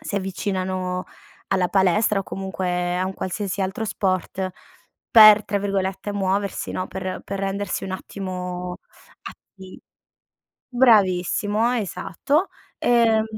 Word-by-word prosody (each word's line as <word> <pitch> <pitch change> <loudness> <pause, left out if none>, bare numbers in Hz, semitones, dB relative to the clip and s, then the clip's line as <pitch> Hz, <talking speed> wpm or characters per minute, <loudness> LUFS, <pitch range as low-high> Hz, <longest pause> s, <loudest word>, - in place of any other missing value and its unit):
si - - -6
avvicinano 185 -2 -2 0.4
alla 185 -2 +1
palestra, 195 +2 +2
o - - -4
comunque 180 -2 -2
a 185 - 0
un 190 - -5
qualsiasi 195 +1 -3
altro 195 +3 -2
sport 190 -2 -2 0.6
per, 215 -2 +9
tra 200 0 -1
virgolette, 195 0 -2
"muoversi" 200 0 -1
no? 185 - -3
Per 185 0 -5
per 195 - -5
rendersi 195 0 -2
un 190 - -5
attimo 180 -2 -5 0.5
atti 190 -2 -12 0.9
bravissimo, 215 -1 +3
esatto. 250 - -1 0.3
Ehm, 230 -2 +3
195 Hz, 110 wpm, -23 LUFS, 185-205 Hz, 0.9 s, per